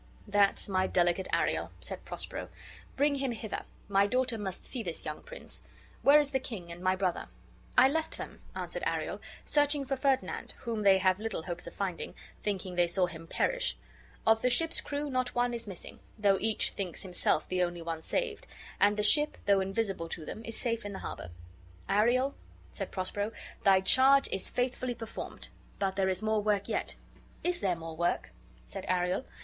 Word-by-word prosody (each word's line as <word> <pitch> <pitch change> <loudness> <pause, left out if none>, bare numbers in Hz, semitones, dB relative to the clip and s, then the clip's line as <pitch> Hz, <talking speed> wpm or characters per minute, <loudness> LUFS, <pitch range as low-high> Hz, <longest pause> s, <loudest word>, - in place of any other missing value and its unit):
"That's 205 -1 +3
my 190 -1 +2
delicate 175 +1 +2
Ariel," - - +1
said - - -7
Prospero. - - -4 0.5
"Bring 290 +1 +3
him 270 -3 -1
hither: 220 -1 -4 0.3
my 200 0 +4
daughter 250 0 +1
must 190 -3 -4
see 250 - -2
this 170 -6 -4
young 150 - -4
prince. - - -7 0.4
Where 285 +2 +8
is 290 -1 +3
the 265 - +2
king, 195 -10 -7
and 170 +1 -8
my 185 0 +3
brother?" 185 -2 -1 0.5
"I - - +9
left 320 +3 -1
them," - - -8
answered - - -4
Ariel, - - -2 0.2
"searching 290 -1 +2
for 270 +1 0
Ferdinand, 265 0 0
whom 230 -3 -2
they 195 -2 +6
have 185 0 +3
little 215 -6 -3
hopes 175 0 -4
of - - -9
finding, 190 -4 -3 0.3
thinking 190 -3 -2
they 175 -1 +3
saw 180 +2 +3
him 165 -2 -9
perish. - - 0 0.5
Of 225 0 +5
the 250 - +3
ship's 325 +7 +3
crew 290 +1 -3
not 255 -1 0
one 245 0 +2
is 235 -2 -4
missing; 190 -4 -8 0.2
though 200 -3 +3
each 220 0 +2
one - - -21
thinks 185 -2 -2
himself 180 -4 +1
the 185 0 0
only 175 -1 -1
one 165 -1 -3
saved; 450 - -2 0.3
and 205 +1 +5
the 210 - +1
ship, 295 +8 +4
though 200 -1 +5
invisible 195 -3 -1
to 160 -2 -5
them, 220 - -6
is 230 0 -3
safe 230 -2 0
in 205 0 -5
the - - -5
harbor." 90 - -6 0.6
"Ariel," 245 +7 +3 0.4
said - - -4
Prospero, 205 +3 -2 0.3
"thy 190 -1 +6
charge 265 +7 +6
is 190 - -2
faithfully 250 0 -1
performed; 225 -1 -7 0.3
but 195 -1 0
there 190 -1 +2
is 185 +2 -1
more 215 -1 +2
work 205 -1 +1
yet." - - -1 0.5
"Is 355 0 +1
there 185 -3 +1
more 165 -1 -7
work?" 170 +2 0 0.3
said - - -7
Ariel. 180 +6 +1
205 Hz, 190 wpm, -31 LUFS, 185-255 Hz, 0.6 s, I